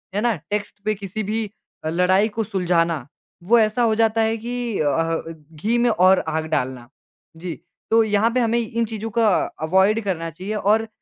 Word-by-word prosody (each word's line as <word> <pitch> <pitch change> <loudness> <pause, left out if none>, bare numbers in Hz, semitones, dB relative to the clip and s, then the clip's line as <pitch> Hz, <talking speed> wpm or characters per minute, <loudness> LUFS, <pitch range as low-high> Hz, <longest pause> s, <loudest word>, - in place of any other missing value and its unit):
है 205 - +1
ना? 235 -1 +2 0.2
टेक्स्ट 205 -1 -3
पे 215 - +2
किसी 200 +2 -5
भी 220 +2 -2 0.4
अ, - - 0
लड़ाई 185 +5 +3
को 225 - +1
सुलझाना, 170 - 0 0.4
वो 230 +6 +4
ऐसा 215 +2 +2
हो 225 -2 +3
जाता 225 0 +2
है 225 0 +1
कि 240 -1 -3
अ 155 - +1
अह, 165 +2 -1 0.2
घी 215 +10 0
में 240 0 +3
और 190 -3 +5
आग 160 0 -1
डालना। 130 -5 -2 0.5
जी। 170 -1 -6 0.3
तो 225 0 +5
यहाँ 215 +1 +2
पे 255 - +2
हमें 235 0 +2
इन 230 0 -1
चीज़ों 220 0 -5
को - - +4 0.4
अवॉइड 190 +6 +3
करना 170 -4 -2
चाहिए 185 +7 -6
और 215 +2 +2
210 Hz, 190 wpm, -22 LUFS, 170-225 Hz, 0.5 s, और